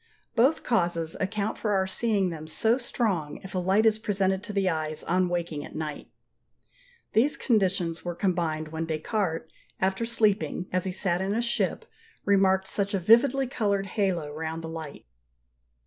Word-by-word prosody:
Both 260 Hz, +7 st, +3 dB
causes 170 Hz, -7 st, 0 dB
account 205 Hz, +2 st, -2 dB
for 210 Hz, -2 st, 0 dB
our 190 Hz, -1 st, +2 dB
seeing 195 Hz, -1 st, 0 dB
them 155 Hz, -1 st, -7 dB
so 225 Hz, +9 st, +2 dB
strong 190 Hz, -, -1 dB
if 190 Hz, -, -9 dB
a 185 Hz, -, 0 dB
light 190 Hz, +5 st, +3 dB
is 220 Hz, -1 st, +4 dB
presented 195 Hz, -3 st, 0 dB
to 210 Hz, -, -5 dB
the 200 Hz, -2 st, +1 dB
eyes 155 Hz, -2 st, -1 dB
on 180 Hz, +1 st, +1 dB
waking 170 Hz, -4 st, -2 dB
at -, -, -10 dB
night. 155 Hz, -2 st, -5 dB, 1.0 s
These 265 Hz, +7 st, +3 dB
conditions 185 Hz, -7 st, +1 dB
were 175 Hz, -1 st, -3 dB
combined 165 Hz, -5 st, -1 dB
when 160 Hz, +1 st, -3 dB
Descartes 160 Hz, 0 st, -2 dB, 0.3 s
after 190 Hz, +4 st, 0 dB
sleeping, 215 Hz, -5 st, +1 dB
as 185 Hz, 0 st, +1 dB
he 190 Hz, -, -1 dB
sat 180 Hz, -1 st, 0 dB
in 195 Hz, +2 st, -1 dB
a 230 Hz, -, +1 dB
ship, 235 Hz, -, 0 dB, 0.4 s
remarked 190 Hz, -1 st, +4 dB
such 200 Hz, +1 st, 0 dB
a -, -, +1 dB
vividly 240 Hz, +8 st, +5 dB
coloured 200 Hz, -6 st, 0 dB
halo 185 Hz, -7 st, -1 dB
round 160 Hz, +1 st, -4 dB
the 160 Hz, -, -5 dB
light. 160 Hz, -3 st, -7 dB
190 Hz, 165 wpm, -27 LUFS, 165-210 Hz, 1.0 s, vividly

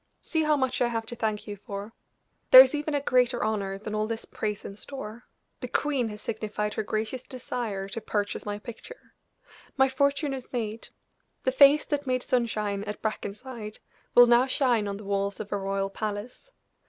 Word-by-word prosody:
See 320 Hz, -, 0 dB
how 305 Hz, -1 st, +3 dB
much 260 Hz, -2 st, 0 dB
I 245 Hz, -, +4 dB
have 225 Hz, -1 st, -2 dB
to 240 Hz, -, -7 dB
thank 215 Hz, -2 st, -2 dB
you 205 Hz, -, -6 dB
for! 205 Hz, +1 st, -7 dB, 0.6 s
There 255 Hz, -, +13 dB
is 260 Hz, +1 st, +4 dB
even 295 Hz, 0 st, -1 dB
a 285 Hz, -, +1 dB
greater 250 Hz, -2 st, +2 dB
honor 200 Hz, -3 st, -1 dB
than 210 Hz, +1 st, -6 dB
all 215 Hz, 0 st, 0 dB
this 230 Hz, 0 st, -4 dB
praise 210 Hz, -2 st, -4 dB
in 195 Hz, -, -7 dB
store; 235 Hz, -1 st, -8 dB, 0.3 s
the -, -, -5 dB
queen 280 Hz, -5 st, 0 dB
has 210 Hz, 0 st, -9 dB
signified 210 Hz, -1 st, -3 dB
her -, -, -1 dB
gracious 220 Hz, +4 st, -2 dB
desire 240 Hz, -6 st, -4 dB
to 225 Hz, +4 st, -5 dB
purchase 205 Hz, -1 st, -2 dB
my 205 Hz, 0 st, -3 dB
picture! 235 Hz, -, -11 dB, 0.6 s
My 265 Hz, 0 st, +5 dB
fortune 280 Hz, +1 st, +1 dB
is 260 Hz, -2 st, -7 dB
made; 225 Hz, -2 st, -4 dB, 0.5 s
the 260 Hz, -, +2 dB
face 280 Hz, +3 st, +6 dB
that 290 Hz, -2 st, -2 dB
made 255 Hz, -1 st, 0 dB
sunshine 215 Hz, -6 st, 0 dB
at 210 Hz, 0 st, -6 dB
Brackenside 215 Hz, +1 st, -5 dB, 0.4 s
will 245 Hz, -, +10 dB
now 240 Hz, +2 st, +5 dB
shine 250 Hz, -6 st, +2 dB
on 200 Hz, 0 st, -3 dB
the 210 Hz, -, -10 dB
walls 200 Hz, 0 st, -1 dB
of 210 Hz, -, -6 dB
a 205 Hz, -, 0 dB
royal 195 Hz, 0 st, -2 dB
palace. 210 Hz, -, -5 dB
225 Hz, 190 wpm, -27 LUFS, 210-260 Hz, 0.6 s, There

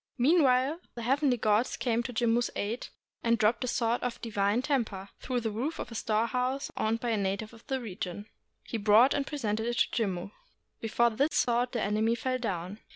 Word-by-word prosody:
Meanwhile 270 Hz, +1 st, +3 dB, 0.2 s
the 235 Hz, -, -5 dB
heavenly 270 Hz, +1 st, +2 dB
gods 215 Hz, +2 st, +1 dB
came 235 Hz, -2 st, +1 dB
to 245 Hz, -, -5 dB
Jimmu's 235 Hz, 0 st, +1 dB
aid, 220 Hz, +4 st, -3 dB, 0.3 s
and 230 Hz, 0 st, +2 dB
dropped 225 Hz, +2 st, +2 dB
a -, -, -2 dB
sword 235 Hz, 0 st, 0 dB
of 245 Hz, -1 st, -3 dB
divine 210 Hz, +1 st, 0 dB
temper 220 Hz, -9 st, -1 dB
through 250 Hz, -2 st, -2 dB
the 220 Hz, -1 st, -2 dB
roof 255 Hz, +10 st, -3 dB
of -, -, -6 dB
a -, -, -6 dB
storehouse 250 Hz, +5 st, -1 dB
owned 225 Hz, +1 st, 0 dB
by 240 Hz, -, -2 dB
a 220 Hz, -, +1 dB
native 200 Hz, +3 st, -2 dB
of 230 Hz, -, -16 dB
the 265 Hz, -1 st, -1 dB
region. 200 Hz, -3 st, -5 dB, 0.4 s
He 230 Hz, -, -4 dB
brought 215 Hz, +6 st, +6 dB
and 280 Hz, -1 st, -1 dB
presented 220 Hz, -6 st, -2 dB
it 240 Hz, 0 st, -1 dB
to -, -, +2 dB
Jimmu. 190 Hz, -1 st, -3 dB, 0.5 s
Be 225 Hz, -, -4 dB
fore 235 Hz, +2 st, +3 dB
this 280 Hz, +7 st, 0 dB
sword 245 Hz, 0 st, +1 dB
the 235 Hz, -, 0 dB
enemy 215 Hz, +3 st, +1 dB
fell 255 Hz, +1 st, -2 dB
down. 190 Hz, -3 st, -4 dB
235 Hz, 200 wpm, -29 LUFS, 215-250 Hz, 0.5 s, brought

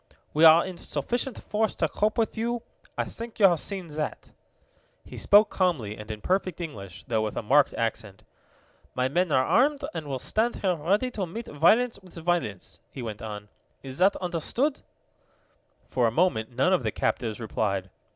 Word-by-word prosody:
"We 155 Hz, +2 st, +5 dB
are 160 Hz, +1 st, +8 dB
in 185 Hz, -2 st, -7 dB
sufficient 240 Hz, -, -2 dB
force 215 Hz, +1 st, -1 dB
to -, -, +1 dB
cope 215 Hz, +1 st, 0 dB
with 225 Hz, -1 st, 0 dB
you. 235 Hz, +1 st, -2 dB, 0.3 s
I -, -, +1 dB
think 230 Hz, 0 st, -6 dB
you 205 Hz, -, +7 dB
have 175 Hz, -4 st, +2 dB
seen 195 Hz, +1 st, -4 dB
that." 150 Hz, 0 st, -5 dB, 0.7 s
He -, -, -11 dB
spoke 210 Hz, +2 st, +5 dB
calmly 150 Hz, -, 0 dB
and 105 Hz, 0 st, -10 dB
in 105 Hz, -1 st, -6 dB
perfect 185 Hz, -2 st, -1 dB
English, 100 Hz, -, -7 dB
though 110 Hz, -2 st, 0 dB
with 110 Hz, -1 st, -3 dB
a -, -, -2 dB
marked 140 Hz, +6 st, +4 dB
accent. 110 Hz, -4 st, -3 dB, 0.7 s
"My 125 Hz, 0 st, +1 dB
men 175 Hz, +5 st, 0 dB
are 130 Hz, -1 st, +3 dB
armed, 280 Hz, -, +3 dB
and 160 Hz, -3 st, -5 dB
will 135 Hz, -2 st, -2 dB
stand 220 Hz, -, 0 dB
here 190 Hz, -2 st, 0 dB
ready 200 Hz, +11 st, 0 dB
to 195 Hz, -6 st, -3 dB
meet 225 Hz, +7 st, -6 dB
violence 220 Hz, +11 st, +3 dB
with 185 Hz, -2 st, -16 dB
violence," 165 Hz, -, -2 dB
he 130 Hz, -, -7 dB
went 110 Hz, -2 st, -6 dB
on. 105 Hz, -2 st, -7 dB, 0.3 s
"Is 135 Hz, +1 st, -6 dB
that 190 Hz, +2 st, +4 dB
understood?" 190 Hz, -, -1 dB, 1.1 s
For 120 Hz, -2 st, +1 dB
a -, -, 0 dB
moment 115 Hz, -7 st, +1 dB
none 130 Hz, +9 st, +2 dB
of 185 Hz, -, +3 dB
the 110 Hz, -3 st, -1 dB
captives 110 Hz, 0 st, -2 dB
replied. 100 Hz, -4 st, -2 dB
165 Hz, 180 wpm, -27 LUFS, -, 1.1 s, are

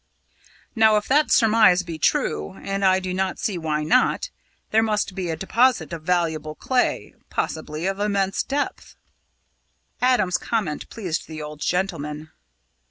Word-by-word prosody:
Now, 220 Hz, -1 st, +5 dB
if 210 Hz, -, -2 dB
that 295 Hz, +3 st, +3 dB
surmise 215 Hz, -5 st, +5 dB
be 165 Hz, -2 st, -7 dB
true 75 Hz, -, 0 dB
and 195 Hz, -, -4 dB
I 190 Hz, -1 st, +4 dB
do 185 Hz, -1 st, -4 dB
not 190 Hz, 0 st, -1 dB
see 210 Hz, -5 st, -2 dB
why 155 Hz, -2 st, -1 dB
not 215 Hz, +12 st, +2 dB, 0.4 s
there 220 Hz, -, +4 dB
must 210 Hz, -3 st, 0 dB
be 185 Hz, -2 st, -4 dB
a 160 Hz, -, -1 dB
deposit 195 Hz, -, +1 dB
of 165 Hz, -, -5 dB
valuable 160 Hz, -3 st, -1 dB
clay 255 Hz, +7 st, -1 dB, 0.2 s
possibly 155 Hz, +1 st, -3 dB
of 195 Hz, +1 st, -1 dB
immense 200 Hz, -2 st, 0 dB
depth." 285 Hz, +1 st, -3 dB, 1.1 s
Adam's 245 Hz, -8 st, +2 dB
comment 200 Hz, -10 st, -2 dB
pleased 185 Hz, -7 st, -4 dB
the 155 Hz, -1 st, -7 dB
old 150 Hz, 0 st, -8 dB
gentleman. 155 Hz, -3 st, -2 dB
185 Hz, 145 wpm, -23 LUFS, 155-215 Hz, 1.1 s, Now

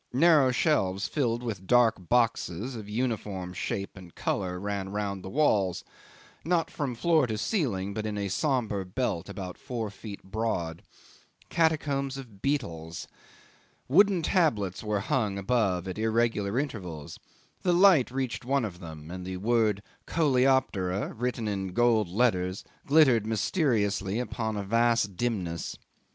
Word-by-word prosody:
Narrow 150 Hz, -1 st, +5 dB
shelves 100 Hz, -, +1 dB
filled 120 Hz, -5 st, -1 dB
with 100 Hz, -6 st, -5 dB
dark 115 Hz, -7 st, +3 dB
boxes 115 Hz, -1 st, +1 dB
of 105 Hz, -2 st, -8 dB
uniform 105 Hz, -6 st, -2 dB
shape 100 Hz, +2 st, -4 dB
and 90 Hz, -3 st, -13 dB
colour 90 Hz, -2 st, -2 dB
ran 100 Hz, -1 st, -3 dB
round 100 Hz, -1 st, -3 dB
the 95 Hz, -, -6 dB
walls, 100 Hz, -, +2 dB, 0.6 s
not 170 Hz, 0 st, +1 dB
from 140 Hz, -5 st, -3 dB
floor 160 Hz, +1 st, +3 dB
to 110 Hz, -2 st, -2 dB
ceiling, 105 Hz, -, -1 dB
but 110 Hz, +1 st, -3 dB
in 105 Hz, -1 st, -3 dB
a 100 Hz, -1 st, -1 dB
sombre 115 Hz, -, 0 dB
belt 95 Hz, -2 st, -2 dB
about 95 Hz, -2 st, -7 dB
four 115 Hz, -5 st, -4 dB
feet 100 Hz, 0 st, -9 dB
broad. 95 Hz, -5 st, -2 dB, 0.7 s
Catacombs 145 Hz, -4 st, +1 dB
of 115 Hz, -8 st, -11 dB
beetles. 85 Hz, -, -2 dB, 0.8 s
Wooden 190 Hz, +4 st, +4 dB
tablets 110 Hz, -, +1 dB
were 105 Hz, -2 st, -1 dB
hung 105 Hz, -3 st, 0 dB
above 100 Hz, -4 st, 0 dB
at 95 Hz, +3 st, -5 dB
irregular 110 Hz, -1 st, +1 dB
intervals. 90 Hz, -, -4 dB, 0.4 s
The 180 Hz, -, +2 dB
light 175 Hz, -6 st, +6 dB
reached 130 Hz, 0 st, -3 dB
one 135 Hz, 0 st, +1 dB
of 90 Hz, -5 st, -7 dB
them, 80 Hz, -2 st, -9 dB
and 90 Hz, 0 st, -6 dB
the 95 Hz, 0 st, -5 dB
word 110 Hz, -1 st, +1 dB, 0.2 s
Coleoptera 130 Hz, -, +1 dB
written 120 Hz, -1 st, -2 dB
in 95 Hz, -3 st, -3 dB
gold 115 Hz, -3 st, +3 dB
letters 95 Hz, -3 st, +1 dB, 0.2 s
glittered 135 Hz, -8 st, +5 dB
mysteriously 105 Hz, -, 0 dB
upon 110 Hz, -3 st, -3 dB
a 100 Hz, -, -2 dB
vast 115 Hz, -1 st, +2 dB
dimness. 90 Hz, -7 st, -2 dB
110 Hz, 140 wpm, -28 LUFS, 95-130 Hz, 0.8 s, light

